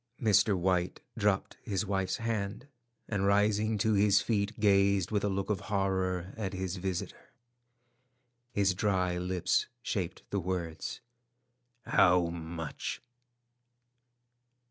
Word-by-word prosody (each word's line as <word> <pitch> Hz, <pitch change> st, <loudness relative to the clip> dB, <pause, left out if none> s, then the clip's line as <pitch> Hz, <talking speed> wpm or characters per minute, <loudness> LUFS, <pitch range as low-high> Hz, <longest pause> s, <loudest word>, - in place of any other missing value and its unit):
Mr. 105 Hz, -3 st, +4 dB
White 90 Hz, 0 st, 0 dB, 0.2 s
dropped 105 Hz, -3 st, 0 dB
his 105 Hz, -1 st, -2 dB
wife's 95 Hz, -2 st, -1 dB
hand, 110 Hz, -1 st, -3 dB, 0.4 s
and 100 Hz, -3 st, 0 dB
rising 105 Hz, +2 st, +2 dB
to 110 Hz, +2 st, +2 dB
his 100 Hz, -1 st, +5 dB
feet, 105 Hz, 0 st, -1 dB
gazed 100 Hz, -2 st, +3 dB
with 105 Hz, -2 st, +1 dB
a 105 Hz, -, +1 dB
look 95 Hz, +1 st, -1 dB
of 100 Hz, -, 0 dB
horror 95 Hz, -2 st, 0 dB
at 100 Hz, -3 st, -3 dB
his 95 Hz, 0 st, -3 dB
visitor. 90 Hz, -1 st, -4 dB, 1.2 s
His 100 Hz, -4 st, +2 dB
dry 90 Hz, -2 st, 0 dB
lips 90 Hz, 0 st, 0 dB, 0.2 s
shaped 95 Hz, -7 st, -3 dB
the 100 Hz, -, 0 dB
words, 90 Hz, -3 st, -4 dB, 0.8 s
"How 90 Hz, -1 st, +4 dB
much?" 80 Hz, -2 st, -5 dB
95 Hz, 115 wpm, -31 LUFS, 90-105 Hz, 1.2 s, his